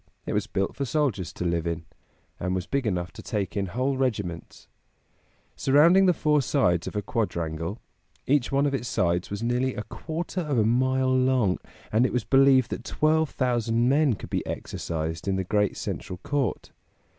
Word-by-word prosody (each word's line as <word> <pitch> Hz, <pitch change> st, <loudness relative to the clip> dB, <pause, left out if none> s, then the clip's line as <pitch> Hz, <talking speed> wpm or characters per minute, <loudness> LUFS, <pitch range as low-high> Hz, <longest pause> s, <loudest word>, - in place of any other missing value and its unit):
It -, -, -3 dB
was 105 Hz, +1 st, 0 dB
built 95 Hz, -3 st, -2 dB
for 140 Hz, -, -2 dB
soldiers 130 Hz, -, -1 dB
to 90 Hz, -, -4 dB
live 85 Hz, -1 st, 0 dB
in, 85 Hz, -1 st, -3 dB, 0.5 s
and 90 Hz, 0 st, -1 dB
was 90 Hz, -1 st, -2 dB
big 140 Hz, -4 st, -1 dB
enough 90 Hz, -3 st, -2 dB
to -, -, -10 dB
take 100 Hz, -4 st, -3 dB
in 100 Hz, -1 st, -1 dB
whole 130 Hz, +8 st, -1 dB
regiments. 100 Hz, -10 st, -3 dB, 0.9 s
Surrounding 165 Hz, +8 st, +5 dB
the -, -, +6 dB
four 150 Hz, -2 st, +2 dB
sides 90 Hz, -7 st, +1 dB
of -, -, -6 dB
a 105 Hz, -, -1 dB
quadrangle, 85 Hz, -3 st, -2 dB, 0.5 s
each 140 Hz, -1 st, +2 dB
one 140 Hz, +1 st, +2 dB
of 140 Hz, -, 0 dB
its 125 Hz, -3 st, -2 dB
sides 85 Hz, -4 st, 0 dB
was 100 Hz, +2 st, -4 dB
nearly 125 Hz, +2 st, 0 dB
a 105 Hz, -, -4 dB
quarter 170 Hz, +7 st, -4 dB
of 150 Hz, -6 st, -1 dB
a 110 Hz, -, +3 dB
mile 130 Hz, +2 st, +2 dB
long, 130 Hz, -7 st, +2 dB, 0.3 s
and 110 Hz, +3 st, +3 dB
it -, -, -6 dB
was 125 Hz, -, 0 dB
believed 135 Hz, -2 st, +4 dB
that -, -, -4 dB
twelve 155 Hz, 0 st, +1 dB
thousand 120 Hz, -2 st, +1 dB
men 140 Hz, -1 st, +3 dB
could -, -, -10 dB
be -, -, 0 dB
exercised 80 Hz, +2 st, -4 dB
in 95 Hz, -, +1 dB
the 95 Hz, -, -1 dB
great 105 Hz, +2 st, 0 dB
central 90 Hz, -, -5 dB
court. 145 Hz, -3 st, -2 dB
120 Hz, 185 wpm, -26 LUFS, 95-135 Hz, 0.9 s, the